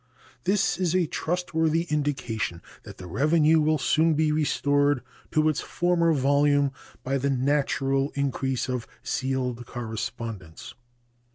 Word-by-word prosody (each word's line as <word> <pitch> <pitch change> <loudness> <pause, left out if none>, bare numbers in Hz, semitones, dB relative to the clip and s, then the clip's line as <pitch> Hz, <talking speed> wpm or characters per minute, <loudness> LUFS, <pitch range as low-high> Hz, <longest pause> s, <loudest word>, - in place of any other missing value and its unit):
This 195 -2 +1
is 180 -2 +1
a 185 -2 +3
trustworthy 165 0 0
indication 120 - -2 0.2
that - - -12
the 90 - -9
revenue 155 - +3
will 155 +1 +2
soon 160 +3 +2
be 155 0 +2
restored 145 -3 +1 0.3
to 155 0 +2
its 155 -2 +1
former 175 -1 +1
volume 145 0 +3 0.3
by 135 +1 -1
the 140 +2 0
natural 135 0 +1
increase 135 -2 -1
of 125 -2 -3 0.2
sealed 130 -2 -2
correspondence. 115 -6 -6
145 Hz, 120 wpm, -26 LUFS, 130-155 Hz, 0.3 s, a